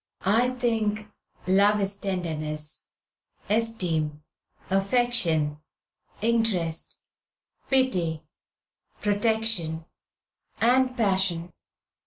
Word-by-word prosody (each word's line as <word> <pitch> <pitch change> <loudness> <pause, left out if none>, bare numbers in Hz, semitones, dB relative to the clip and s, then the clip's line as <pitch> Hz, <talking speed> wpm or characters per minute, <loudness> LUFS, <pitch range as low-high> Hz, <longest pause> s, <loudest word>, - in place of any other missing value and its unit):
"I 225 +6 +4
think 220 -4 -1 0.3
love 200 +3 +4
is 195 0 0
tenderness, 155 -6 -2 0.6
esteem, 175 -9 -1 0.5
affection, 195 -8 +1 0.6
interest, 220 -8 0 0.7
pity, 180 - +1 0.8
protection, 205 -6 +1 0.7
and 255 +2 +3
passion. 190 -5 +1
200 Hz, 60 wpm, -26 LUFS, 165-225 Hz, 0.8 s, I